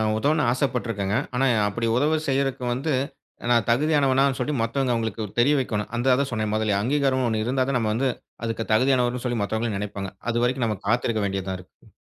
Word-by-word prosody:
உதவவேண்டும் 125 +7 +2
என்று 130 - +2
ஆசைப்பட்டு 125 -1 -1
இருக்கேங்க. 100 -2 -1 0.2
ஆனா, 135 +2 +2 0.2
அப்படி 115 +3 -3
உதவி 150 +4 +2
செய்கிறதுக்கு 135 -2 0
வந்து 140 +5 -1 0.6
நான் 115 -2 +3
தகுதியானவன் 135 +1 +3
என்று 135 -2 +1
சொல்லிவிட்டு 125 -1 0
மத்தவங்க 125 +2 0
உங்களுக்குத் 110 -1 -4
தெரியவைக்கவேண்டும். 120 -6 +1
அதைத் 125 +1 +3
தான் 140 - -3
சொன்னேன் 110 -2 -1
முதலில். 110 -2 +1
அங்கீகாரம் 130 +1 +1
ஒன்று 110 -1 0
இருந்தால்தான் 130 +1 +1
நம்ம 110 -2 0
வந்து 130 +4 +1 0.4
அதுக்கு 115 0 -2
தகுதியானவர் 125 +1 +3
என்று 125 - -5
சொல்லி 120 -2 -1
மத்தவங்களும் 110 0 -1
நினைப்பாங்க. 100 -1 -5 0.2
அதுவரைக்கும் 120 +1 +1
நாம 105 -3 -2
காத்திருக்க 115 -1 +1
வேண்டியது 95 -1 -3
தான் 95 - -2
இருக்கு. 90 - -19
120 Hz, 185 wpm, -24 LUFS, 110-135 Hz, 0.6 s, நான்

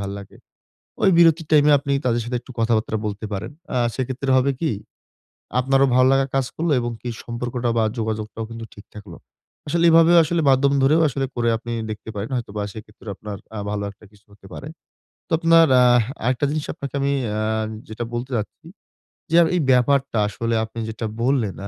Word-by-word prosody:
ভাল্লাগে, 100 0 -7 0.7
ওই - - +5
বিরতির 165 -2 +4
টাইম 150 -1 +5
এ - - +6
আপনি 140 0 -4
তাদের 120 -1 +1
সাথে 125 +1 -2
একটু 130 - -13
কথাবার্তা 110 -1 +1
বলতে 105 +1 -4
পারেন। 110 +7 -5 0.2
আ - - +2 0.2
সেক্ষেত্রে 130 +1 -3
হবে 135 +2 +2
কি? 160 - +1 0.9
আপনারও 135 +1 +3
ভালোলাগা 135 +1 +4
কাজ 135 -2 +1
করলো 165 -1 0
এবং 120 0 -3
কি 125 - -5 0.2
সম্পর্কটা 120 +1 -3
বা 110 - +3
যোগাযোগটাও 110 0 -3
কিন্তু 115 0 -7
ঠিক 105 - -13
থাকলো। 100 -5 -10 0.5
আসলে 170 +3 0
এভাবে 165 +1 +6
আসলে 165 +2 0
মাধ্যম 140 +1 +3
ধরেও 150 +5 +4
আসলে 135 0 -2
করে 120 -1 +1
আপনি 120 +1 -7 0.2
দেখতে 110 +1 -8
পারেন 105 +5 -5
হয়তো 120 -4 -5
বা - - -1
সেক্ষেত্রে 110 0 -12
আপনার 105 -1 -7 0.2
আ - - -4
ভালো 105 -1 -2
একটা 100 +2 -18
কিছু 105 0 -24
হতে 100 -1 -17
পারে। 145 - -8 0.6
তো - - -32
আপনার 165 -1 +5
আহ 120 -2 +5 0.2
আরেকটা 130 +3 +1
জিনিস 155 -1 -2
আপনাকে 140 0 -7
আমি 140 0 +1 0.3
আ - - -1 0.5
যেটা 110 +2 -5
বলতে 120 +3 -4
চাচ্ছি। 110 +9 -7 0.7
যে - - +2
এ - - +7
এই 175 - +1
ব্যাপারটা 135 0 +2
আসলে 115 +3 -2
আপনি 115 +1 -9
যেটা 110 +1 -5 0.2
বললেন 125 -7 +1
125 Hz, 185 wpm, -22 LUFS, 110-140 Hz, 0.9 s, এ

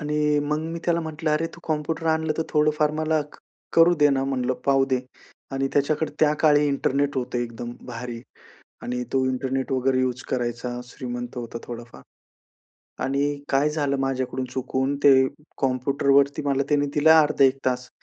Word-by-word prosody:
आणि 150 0 +1
मग 150 +1 -1
मी 170 - -4
त्याला 170 -1 +1
म्हटलं, 160 -1 -3
अरे, 150 +2 +1
तू 170 - -14
कॉम्प्युटर 160 +1 -2
आणलं, 160 -1 +1
तर - - +2
थोडंफार 150 0 +2
मला 155 0 +1
क - - -14 0.4
करू 170 +1 +6
दे 150 -2 +4
ना 135 -1 +1
म्हटलं, 130 -2 -1
पाहू 135 -1 +4
दे. 130 -2 0 0.5
आणि 135 0 0
त्याच्याकडे 145 +2 0
त्याकाळी 150 -1 +4
इंटरनेट 140 0 0
होतं 125 -1 -2
एकदम 120 0 -5
भारी 120 -1 -6 0.6
आणि 125 0 -3
तो 130 -1 +2
इंटरनेट 130 +1 -2
वगैरे 130 0 +1
युज 130 0 -1
करायचा. 120 0 -2
श्रीमंत 125 0 -7
होता 120 -1 -5
थोडाफार. 120 - -9 1.0
आणि 140 +2 0
काय 140 +2 +2
झालं, 145 -2 0
माझ्याकडून 130 -1 -2
चुकून 130 +1 -1
ते 140 - +9 0.5
कॉम्प्युटरवरती 140 +2 +2
मला 140 -1 +2
त्यांनी 145 -1 +2
दिलं 150 +2 +4
अर्धा 150 -3 +5
1 135 0 +3
तास 125 0 -1
135 Hz, 160 wpm, -24 LUFS, 130-150 Hz, 1.0 s, ते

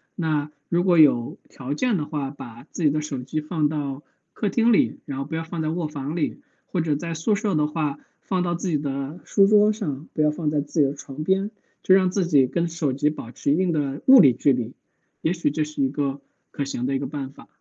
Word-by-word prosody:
那 155 -4 -1 0.2
如 175 +1 +2
果 180 -3 +4
有 130 -6 +4
条 135 +2 -5
件 225 +7 +1
的 150 - -2
话， 145 -3 -3
把 120 -3 -11
自 170 - -6
己 150 - +5
的 155 +1 0
手 140 -4 -5
机 155 +5 -3
放 155 -1 0
到 145 -2 -4 0.3
客 210 - -2
厅 230 +4 +3
里， 215 - +2
然 140 -2 -5
后 135 - -3
不 - - -9
要 160 0 -2
放 165 0 -4
在 155 - -1
卧 165 0 -2
房 145 0 -5
里。 175 - -2 0.3
或 180 - -1
者 155 -2 0
在 165 +3 -4
宿 165 +7 +1
舍 200 -2 -1
的 150 -1 +2
话， 150 -2 -2 0.2
放 185 -2 -1
到 175 -1 0
自 175 +2 -3
己 155 - +2
的 140 +2 -4
书 195 -1 +4
桌 210 +1 +5
上， 155 - -5
不 155 - 0
要 150 - +4
放 150 0 -2
在 150 -1 +1
自 150 +2 -1
己 - - +5
的 135 - -3
床 145 0 -8
边， 190 +4 +1 0.3
就 185 - +5
让 185 -1 +3
自 185 -2 0
己 145 -6 +5
跟 170 +6 -1
手 165 -5 -1
机 145 +3 +1
保 135 -6 -7
持 140 - -1
一 - - +4
定 180 +1 +1
的 145 -3 -2
物 265 -1 +9
理 135 -7 +6
距 140 - +3
离， 120 0 -3 0.5
也 160 - +2
许 170 -4 0
这 155 +2 -1
是 150 -1 -4
一 135 - +2
个 140 0 -2 0.3
可 140 - -3
行 135 -3 -3
的 135 +1 0
一 - - 0
个 140 - -3
办 135 -1 -5
法。 - - -16
150 Hz, 275 characters per minute, -24 LUFS, 140-175 Hz, 0.5 s, 物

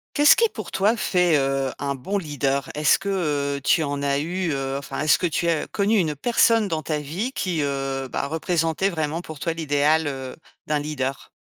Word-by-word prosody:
Qu'est-ce 290 0 +7
qui 460 -1 +3
pour - - -8
toi 210 +5 +2
fait, 180 -6 +2
heu, 135 -1 0
un 140 0 -2
bon 190 +10 -3
leader? 140 -5 -1
Est-ce 150 0 +3
que, 195 - -6 0.5
heu, - - -6
tu 160 +4 +3
en 140 -1 -3
as 140 0 +1
eu 175 +3 -2
heu, 135 -1 -2
enfin 140 0 -5
est-ce 155 +1 +4
que 180 - 0
tu 170 +2 -1
as 165 -2 0
connu 205 +2 +1
une 155 -5 0
personne 230 - +3
dans 160 -5 -2
ta 155 +1 -2
vie 170 - -3
qui, 180 -10 -2
heu, 135 -1 -2
bah, 140 - -2
représentait 165 +4 0
vraiment 160 -2 -2
pour 155 -3 -9
toi 165 +4 -1
l'idéal, 155 0 +1
heu, 130 -2 -6 0.3
d'un 150 -1 0
leader? 140 -2 -4
155 Hz, 205 wpm, -23 LUFS, 140-180 Hz, 0.5 s, Qu'est-ce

